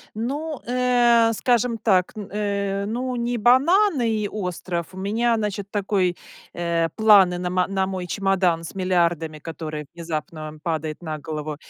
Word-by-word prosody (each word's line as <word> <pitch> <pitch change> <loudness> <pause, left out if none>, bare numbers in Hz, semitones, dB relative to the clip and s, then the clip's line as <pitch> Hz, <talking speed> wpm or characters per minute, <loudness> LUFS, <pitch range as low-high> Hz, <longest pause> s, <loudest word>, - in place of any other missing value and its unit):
Ну, 285 +7 -3
э, 240 -2 +3
скажем 240 0 +1
так, 185 -5 +2
н 210 -3 -6
э, 200 -1 -1
ну, 250 +4 -2
не 240 0 -1
бананы 270 - +4
и 215 -2 -1
остров. 180 -4 -4
У 185 - -10
меня, 225 +5 +1
значит, 205 -2 -3
такой, 195 -3 0 0.4
э, 170 -1 0
планы 200 -5 +6
на 180 0 -2
ма 180 0 +1
на 190 -1 -1
мой 185 -2 -4
чемодан 185 -3 +1
с 165 - -8
миллиардами, 170 -4 0
который 155 -1 -6
внезапно 155 -2 -5
падает 160 -2 -3
на 155 -2 -4
голову. 150 0 -5
195 Hz, 150 wpm, -23 LUFS, 170-230 Hz, 0.4 s, планы